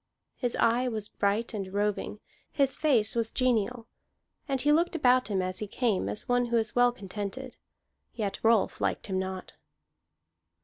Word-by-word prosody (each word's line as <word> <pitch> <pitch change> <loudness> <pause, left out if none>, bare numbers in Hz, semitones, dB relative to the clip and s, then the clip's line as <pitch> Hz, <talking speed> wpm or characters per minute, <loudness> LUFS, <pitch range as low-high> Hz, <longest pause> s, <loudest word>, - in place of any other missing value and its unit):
His 245 -2 -2
eye 240 +2 +2
was 215 -4 -4
bright 210 +4 0
and 195 -3 -4
roving; 205 +1 -2 0.3
his 275 -1 +1
face 240 -9 +2
was 230 -1 0
genial, 245 -2 0 0.6
and 270 -2 -1
he 295 +3 +3
looked 335 +3 +2
about 255 -4 +3
him 195 -3 0
as 185 0 -3
he 210 - -4
came 205 - 0
as 105 - -3
one 245 0 +2
who 235 0 +1
is 220 -1 0
well 245 0 +5
contented. 210 +4 -6 0.6
Yet 205 -4 -3
Rolf 225 -2 +2
liked - - -1
him 190 -3 -1
not. 190 0 -5
225 Hz, 165 wpm, -28 LUFS, 200-250 Hz, 0.6 s, well